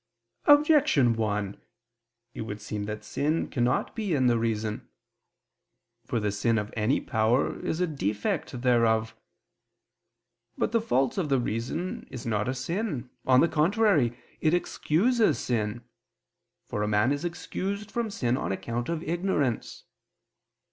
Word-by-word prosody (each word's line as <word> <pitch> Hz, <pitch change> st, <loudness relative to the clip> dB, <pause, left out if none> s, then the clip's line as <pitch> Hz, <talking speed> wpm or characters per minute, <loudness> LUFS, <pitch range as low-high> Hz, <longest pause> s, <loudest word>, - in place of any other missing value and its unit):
Objection 290 Hz, -, +5 dB
1: 105 Hz, -3 st, -2 dB, 0.7 s
It -, -, -6 dB
would 105 Hz, -1 st, -5 dB
seem 105 Hz, 0 st, -4 dB
that 105 Hz, 0 st, -5 dB
sin 155 Hz, +3 st, -1 dB
cannot 120 Hz, 0 st, 0 dB
be 210 Hz, -7 st, -1 dB
in 130 Hz, -2 st, +2 dB
the 120 Hz, -2 st, +3 dB
reason. 110 Hz, -2 st, -2 dB, 1.2 s
For 120 Hz, -, 0 dB
the 105 Hz, -1 st, 0 dB
sin 110 Hz, +3 st, +1 dB
of 105 Hz, 0 st, -3 dB
any 115 Hz, +5 st, +2 dB
power 110 Hz, +4 st, +1 dB
is 160 Hz, -, -2 dB
a 180 Hz, -, +3 dB
defect 120 Hz, -, -2 dB
thereof. 115 Hz, -2 st, +2 dB, 1.4 s
But -, -, 0 dB
the 230 Hz, -1 st, +2 dB
fault 135 Hz, -, +1 dB
of 165 Hz, -5 st, -1 dB
the 135 Hz, -2 st, +3 dB
reason 120 Hz, -, -3 dB
is 125 Hz, -, -8 dB
not 105 Hz, -1 st, 0 dB
a 130 Hz, -, -1 dB
sin, 145 Hz, -, -3 dB, 0.2 s
on 130 Hz, 0 st, +6 dB
the 170 Hz, -, +5 dB
contrary, 160 Hz, -, +2 dB, 0.2 s
it 160 Hz, +2 st, +3 dB
excuses 195 Hz, -, +2 dB
sin: 115 Hz, -1 st, -2 dB, 0.8 s
for 105 Hz, -, -3 dB
a 105 Hz, -, 0 dB
man 105 Hz, +4 st, +2 dB
is 145 Hz, +2 st, -1 dB
excused 195 Hz, +4 st, -4 dB
from 235 Hz, -2 st, -1 dB
sin 125 Hz, -, 0 dB
on -, -, -2 dB
account 120 Hz, +6 st, -3 dB
of 165 Hz, -1 st, -2 dB
ignorance. 165 Hz, -, -1 dB
125 Hz, 140 wpm, -27 LUFS, 110-170 Hz, 1.4 s, on